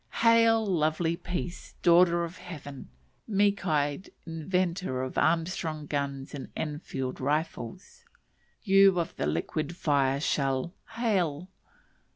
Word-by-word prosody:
Hail, 230 Hz, -1 st, +5 dB
lovely 165 Hz, -2 st, +1 dB
peace, 175 Hz, 0 st, -5 dB
daughter 170 Hz, 0 st, +5 dB
of 170 Hz, +1 st, -6 dB
heaven! 145 Hz, -6 st, -9 dB, 0.4 s
meek 200 Hz, -2 st, +1 dB
eyed 145 Hz, +2 st, 0 dB, 0.2 s
inventor 170 Hz, -3 st, -1 dB
of 130 Hz, -, -5 dB
Armstrong 160 Hz, -2 st, 0 dB
guns 140 Hz, -2 st, -3 dB
and 140 Hz, -, -7 dB
Enfield 145 Hz, -4 st, -4 dB
rifles; 150 Hz, -, -3 dB, 0.6 s
you 195 Hz, -2 st, +5 dB
of 170 Hz, -, -3 dB
the 70 Hz, -, -1 dB
liquid 155 Hz, -, -2 dB
fire 140 Hz, -4 st, +1 dB
shell, 135 Hz, +2 st, 0 dB, 0.2 s
hail! 185 Hz, -8 st, 0 dB
165 Hz, 110 wpm, -28 LUFS, 145-185 Hz, 0.6 s, Hail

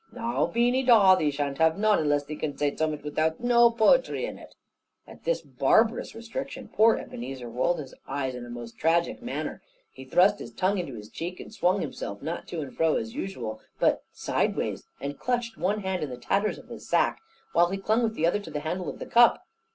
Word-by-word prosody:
"Now, 235 Hz, -1 st, -1 dB
Beany 245 Hz, +3 st, +2 dB
Dawe, 225 Hz, -7 st, +7 dB
thee 155 Hz, -5 st, +1 dB
shan't 140 Hz, 0 st, -3 dB
have 160 Hz, +1 st, +4 dB
none, 215 Hz, 0 st, +3 dB
unless 145 Hz, -2 st, +1 dB
thee 150 Hz, -, -6 dB
can 150 Hz, -2 st, -4 dB
zay 145 Hz, -1 st, 0 dB
zummut 155 Hz, -2 st, -1 dB
without 155 Hz, +2 st, 0 dB
no 240 Hz, -1 st, +5 dB
poetry 235 Hz, -, +3 dB
in -, -, -7 dB
it." -, -, -14 dB, 0.5 s
At -, -, -15 dB
this -, -, 0 dB
barbarous 225 Hz, +1 st, +2 dB
restriction, 260 Hz, +3 st, -6 dB
poor 220 Hz, +2 st, +5 dB
Ebenezer 125 Hz, +1 st, -7 dB
rolled 130 Hz, +9 st, 0 dB
his 140 Hz, -4 st, -8 dB
eyes 135 Hz, -1 st, -2 dB
in 125 Hz, -1 st, -7 dB
a 120 Hz, -, -9 dB
most 120 Hz, -1 st, -8 dB
tragic 170 Hz, +6 st, +1 dB
manner; 245 Hz, -, -4 dB, 0.3 s
he 130 Hz, -, -11 dB
thrust 185 Hz, +9 st, +4 dB
his -, -, -8 dB
tongue 190 Hz, +1 st, +1 dB
into 140 Hz, -8 st, -5 dB
his 105 Hz, -1 st, -9 dB
cheek, 175 Hz, +2 st, -5 dB
and -, -, -10 dB
swung 185 Hz, -2 st, +2 dB
himself, 100 Hz, +4 st, -5 dB
not 165 Hz, +3 st, -4 dB
to 170 Hz, -, -4 dB
and 135 Hz, -3 st, -8 dB
fro 160 Hz, -1 st, +2 dB
as 230 Hz, 0 st, -3 dB
usual, 125 Hz, -, -5 dB, 0.2 s
but -, -, +2 dB
sideways, -, -, -1 dB
and 140 Hz, 0 st, -5 dB
clutched 240 Hz, -2 st, -1 dB
one 210 Hz, +3 st, -1 dB
hand 190 Hz, -2 st, -2 dB
on 150 Hz, -, -3 dB
the 125 Hz, -, -6 dB
tatters 195 Hz, +12 st, 0 dB
of -, -, -14 dB
his -, -, -10 dB
sack, -, -, +2 dB, 0.3 s
while 175 Hz, +1 st, +4 dB
he 195 Hz, -, -2 dB
clung 215 Hz, +4 st, +1 dB
with 225 Hz, -2 st, 0 dB
the 165 Hz, -, +1 dB
other 175 Hz, +5 st, +2 dB
to 205 Hz, -, -9 dB
the 150 Hz, -1 st, -4 dB
handle 175 Hz, +4 st, -3 dB
of -, -, -7 dB
the -, -, -6 dB
cup. 240 Hz, 0 st, +5 dB
175 Hz, 215 wpm, -27 LUFS, 145-225 Hz, 0.5 s, Dawe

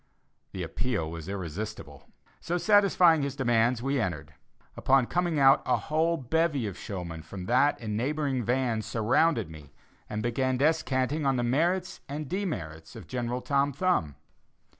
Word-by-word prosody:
The 95 Hz, -, -5 dB
appeal 90 Hz, -1 st, -2 dB
was 85 Hz, +1 st, -7 dB
irresistible; 95 Hz, -5 st, -6 dB, 0.3 s
so, 175 Hz, +1 st, -2 dB
satisfying 185 Hz, -5 st, +4 dB
his 140 Hz, -1 st, -3 dB
demands, 120 Hz, -2 st, +1 dB
we 135 Hz, 0 st, 0 dB
entered. 85 Hz, -8 st, -4 dB, 0.4 s
Upon 135 Hz, -1 st, +3 dB
coming 175 Hz, +2 st, 0 dB
out, 135 Hz, -1 st, +6 dB
a 125 Hz, -, +2 dB
whole 160 Hz, +2 st, 0 dB
bevy 145 Hz, -1 st, 0 dB
of 100 Hz, -3 st, -4 dB
showmen 90 Hz, -5 st, -6 dB
from 90 Hz, +4 st, -8 dB
that 130 Hz, +7 st, +3 dB
and 110 Hz, -3 st, -4 dB
neighboring 135 Hz, +1 st, -1 dB
vans 120 Hz, -2 st, 0 dB
surrounded 120 Hz, -, +1 dB
me, 75 Hz, -2 st, -13 dB, 0.4 s
and 105 Hz, 0 st, -3 dB
began 130 Hz, +2 st, 0 dB
descanting 145 Hz, -1 st, +1 dB
on 135 Hz, -, +2 dB
the 120 Hz, -, 0 dB
merits 175 Hz, +9 st, 0 dB
and 145 Hz, +1 st, -4 dB
demerits 80 Hz, -, -4 dB
of 110 Hz, -6 st, -9 dB
General 125 Hz, +4 st, -3 dB
Tom 140 Hz, +1 st, +1 dB
Thumb. 140 Hz, -, 0 dB
125 Hz, 150 wpm, -28 LUFS, 105-150 Hz, 0.4 s, out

